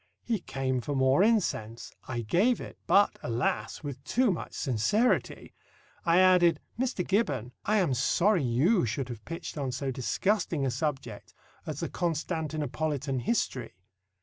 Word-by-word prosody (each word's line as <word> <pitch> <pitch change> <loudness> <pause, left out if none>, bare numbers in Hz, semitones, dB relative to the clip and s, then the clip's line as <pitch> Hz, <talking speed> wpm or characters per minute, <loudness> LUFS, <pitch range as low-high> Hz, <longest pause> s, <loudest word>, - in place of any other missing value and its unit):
He 230 -3 -1
came 130 -5 -2
for 145 +3 -3
more 130 +4 +4
incense. 175 - 0
I 120 -2 -3
gave 190 - +2
it, - - -9
but, 200 +1 +4
alas, 115 +1 -2
with 140 -3 -6
too 250 -3 +2
much 170 - -5
sincerity! 135 - 0 0.5
I 170 0 +4
added, 180 -4 +5 0.2
"Mr. 245 -8 -1
Gibbon, 145 - 0
I 215 +1 +2
am 180 -9 +2
sorry 175 - +2
you 135 - +2
should 130 +3 -3
have 115 -3 -7
pitched 165 -2 -6
on 135 -2 -2
so 130 +2 -3
disgusting 165 - 0
a 130 - 0
subject 130 -4 -4 0.3
as - - -4
the - - -1
Constantinopolitan 155 -4 -2
History. 125 - -2
145 Hz, 145 wpm, -29 LUFS, 130-185 Hz, 0.5 s, added